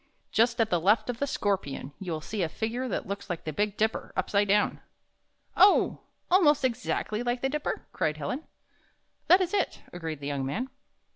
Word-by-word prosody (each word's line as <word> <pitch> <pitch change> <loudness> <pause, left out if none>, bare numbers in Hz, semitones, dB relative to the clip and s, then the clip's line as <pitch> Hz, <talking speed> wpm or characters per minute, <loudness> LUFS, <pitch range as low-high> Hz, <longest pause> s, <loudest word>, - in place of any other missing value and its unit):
"Just 230 +1 +3
at 225 -1 +2
the 175 - +3
left 215 +6 +3
of 235 - -10
the 280 - 0
Scorpion, 190 - -2
you 190 -3 -5
will 155 -1 -3
see 210 +6 -4
a 165 - 0
figin^e 235 +8 -3
that - - -2
looks 200 +1 -5
like 175 -2 -3
the 155 - -4
Big 210 +4 -1
Dipper 220 +1 0
up - - -2
side 205 0 +3
down." 205 +1 +2 0.7
"Oh! 400 +1 +5 0.3
almost 300 -7 +5
exactly 230 -2 -1
like 245 0 -1
the 270 - +2
Dipper?" 300 +1 -3
cried 155 0 0
Helen. 155 - -3 0.8
"That 360 +3 +7
is 370 +1 -1
it," 400 - 0
agreed 165 -4 -5
the 140 - -8
young 140 -1 -2
man. 225 - -3
215 Hz, 195 wpm, -28 LUFS, 175-255 Hz, 0.8 s, That